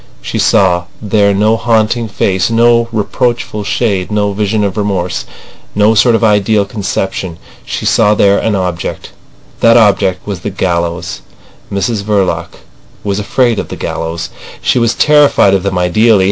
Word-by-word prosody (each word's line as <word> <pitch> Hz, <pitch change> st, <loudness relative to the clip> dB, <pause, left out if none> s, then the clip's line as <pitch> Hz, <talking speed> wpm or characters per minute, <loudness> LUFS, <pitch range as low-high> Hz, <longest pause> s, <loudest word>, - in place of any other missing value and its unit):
She -, -, -4 dB
saw 90 Hz, -2 st, +2 dB
there 105 Hz, -1 st, +1 dB
no 105 Hz, +3 st, +2 dB
haunting 115 Hz, 0 st, 0 dB
face, 95 Hz, -2 st, 0 dB
no 115 Hz, 0 st, +3 dB
reproachful 110 Hz, 0 st, -2 dB
shade, 100 Hz, -5 st, -1 dB
no 105 Hz, -1 st, 0 dB
vision 105 Hz, +1 st, -1 dB
of 100 Hz, -2 st, -2 dB
remorse, 95 Hz, -4 st, -2 dB, 0.5 s
no 105 Hz, +2 st, +3 dB
sort 115 Hz, +2 st, +4 dB
of 115 Hz, -, -1 dB
ideal 105 Hz, -1 st, +2 dB
conception. 95 Hz, -3 st, -4 dB, 0.3 s
She -, -, -5 dB
saw 105 Hz, +1 st, +3 dB
there 100 Hz, -1 st, +3 dB
an 110 Hz, -, 0 dB
object. 90 Hz, -3 st, -4 dB, 0.5 s
That 115 Hz, 0 st, +5 dB
object 100 Hz, -4 st, +2 dB
was 100 Hz, -4 st, -5 dB
the 105 Hz, -, -4 dB
gallows. 85 Hz, -2 st, -2 dB, 0.5 s
Mrs 100 Hz, +2 st, -1 dB
Verloc 100 Hz, -2 st, 0 dB, 0.6 s
was 100 Hz, 0 st, -2 dB
afraid 115 Hz, +2 st, +1 dB
of -, -, -4 dB
the -, -, -7 dB
gallows. 80 Hz, 0 st, -4 dB, 0.3 s
She -, -, +1 dB
was 115 Hz, -1 st, +1 dB
terrified 150 Hz, -9 st, +4 dB
of 95 Hz, -, +2 dB
them 100 Hz, 0 st, -2 dB
ideally. 105 Hz, +5 st, +3 dB
105 Hz, 150 wpm, -12 LUFS, 95-110 Hz, 0.6 s, That